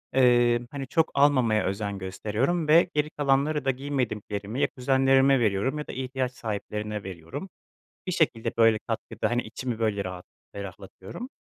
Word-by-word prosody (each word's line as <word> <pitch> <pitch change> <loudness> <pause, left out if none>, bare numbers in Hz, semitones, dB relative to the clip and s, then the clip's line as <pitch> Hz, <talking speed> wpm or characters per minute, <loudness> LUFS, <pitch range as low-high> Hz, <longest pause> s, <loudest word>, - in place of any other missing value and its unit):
ııı, 120 -2 +5
hani 135 -2 -5
çok 160 +3 +1
almamaya 130 -6 +3
özen 100 +1 -2
gösteriyorum 110 - -1
ve 165 +3 +6
geri 150 0 +1
kalanları 145 0 +1
da 135 - +4
giymediklerimi 120 -4 -3
ya - - +4
kuzenlerime 135 +1 +4
veriyorum 110 +5 +1
ya 150 - -6
da - - -5
ihtiyaç 130 0 -2
sahiplerine 105 -2 -4
veriyorum. 90 - -7 0.6
Bir 185 - -1
şekilde 150 -10 +1
böyle 115 -1 +5
katkıda, - - -2
hani 120 +1 +1
içimi 120 +1 -5
böyle 105 -3 0
rahat 90 -1 -6 0.3
ferahlatıyorum. 100 - -8
125 Hz, 145 wpm, -26 LUFS, 105-140 Hz, 0.6 s, ve